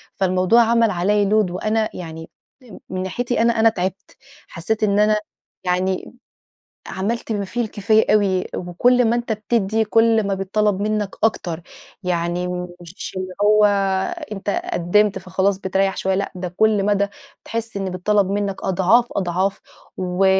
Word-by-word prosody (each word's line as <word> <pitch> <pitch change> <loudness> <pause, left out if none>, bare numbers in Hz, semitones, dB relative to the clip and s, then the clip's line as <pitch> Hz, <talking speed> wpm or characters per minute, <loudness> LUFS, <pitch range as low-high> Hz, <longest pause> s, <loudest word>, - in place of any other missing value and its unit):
فالموضوع 185 +4 +3
عمَل 230 -1 +3
عليَّ 200 +3 +1
لود 210 -3 +2
وأنا 215 +4 0
يعني، 160 -2 -8 0.3
م 235 -6 -13
من 185 0 -3
ناحيتي 240 +5 -1
أنا 235 0 +3
أنا 225 0 +6
تعِبت، 190 -1 -5 0.3
حسّيت 215 +6 -3
إن 205 0 +2
أنا 210 0 +4 0.5
يعني 185 +4 -1 0.8
عمَلت 220 +4 -3
ما 200 -1 -2
فيه 240 +5 -4
الكفاية 215 -1 +2
أوي 190 -3 +2
وكل 245 +8 +2
ما 230 +1 +2
أنت 240 -2 -2
بتدّي، 220 0 0
كل 225 0 +3
ما 195 - 0
بيتْطلب 195 +1 0
منك 210 -2 -1
أكتر. 175 -6 -1 0.4
يعني 175 0 -1 0.3
مش 175 +2 -8
اللي 185 0 -4
هو 210 0 +5 0.7
أنت 200 0 -3 0.2
قِّدمت 205 +4 +2
فخلاص، 190 +1 0
بتريّح 195 0 0
شويّة، 190 0 0
لأ 200 +1 -2
ده 180 -1 -6
كل 215 -2 +3
مدى 200 -1 +2 0.4
بتحس 230 -2 -4
إن 195 -1 -2
بيتطلب 195 +2 +1
منك 200 -1 -2
أضعاف، 190 +6 +3
أضعاف، 190 +2 -1 0.4
و 185 +1 0
200 Hz, 145 wpm, -21 LUFS, 185-215 Hz, 0.8 s, أنا